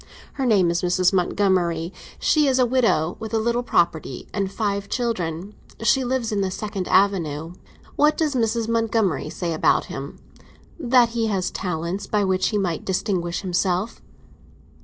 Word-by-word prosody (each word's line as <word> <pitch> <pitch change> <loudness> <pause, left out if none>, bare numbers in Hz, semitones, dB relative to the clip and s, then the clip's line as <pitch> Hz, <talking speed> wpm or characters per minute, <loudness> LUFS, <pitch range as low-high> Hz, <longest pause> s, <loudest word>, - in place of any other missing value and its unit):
Her 270 -2 -1
name 190 -7 +4
is 170 - -1
Mrs. 180 +1 +2
Montgomery; 180 -2 +1 0.2
she 300 -2 +3
is 260 -1 +2
a 255 - +4
widow, 230 -10 +1
with 225 0 -4
a - - +3
little 235 +2 0
property 170 - 0
and 195 -2 -1
five 200 -2 -2
children. 195 -6 -2 0.3
She 245 +4 +3
lives 250 -2 -1
in 205 -2 0
the 190 - 0
Second 200 -1 -4
Avenue." 170 -5 +1 0.4
"What 300 +1 +4
does 310 -3 0
Mrs. 230 -2 0
Montgomery 225 -4 0
say 170 -2 -3
about 155 - +2
him?" 135 +1 -7 0.6
"That 245 -4 +4
he 230 -1 -1
has 190 -4 -1
talents 180 +2 -3
by 210 -1 +1
which 185 -1 +1
he 210 - 0
might 180 -5 -1
distinguish 180 -3 -1
himself." 185 +3 -1
200 Hz, 160 wpm, -23 LUFS, 175-230 Hz, 0.6 s, name